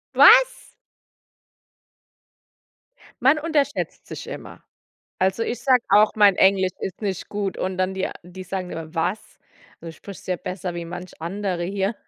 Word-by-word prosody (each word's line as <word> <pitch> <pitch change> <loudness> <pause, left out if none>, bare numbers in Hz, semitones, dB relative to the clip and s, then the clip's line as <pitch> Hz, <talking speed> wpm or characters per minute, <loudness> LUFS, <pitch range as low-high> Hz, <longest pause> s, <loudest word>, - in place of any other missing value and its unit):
Was? - - +6 2.5
Man 275 +5 +4
unterschätzt 305 -3 -1
sich - - -8
immer. - - -9 0.6
Also, 190 +4 +1
ich 235 +1 -3
sage 250 -1 +3
auch, 210 +2 +5
mein 205 -3 +6
Englisch 190 -1 +3
ist 185 - -5
nicht 195 -3 -3
gut 205 -2 -3
und 185 0 -2
dann 185 +1 0
die 190 - -1
a - - -6
die 180 +2 -10
sagen 185 0 -5
immer: 160 -1 -7
„Was? 180 +6 -3 0.4
Also, 165 - -8
du - - -11
sprichst 195 +4 -12
ja 185 - -1
besser 180 0 -5
wie 170 - -5
manch 180 +1 -9
andere 180 +1 -3
hier." 195 +3 -1
190 Hz, 155 wpm, -23 LUFS, 180-210 Hz, 2.5 s, Was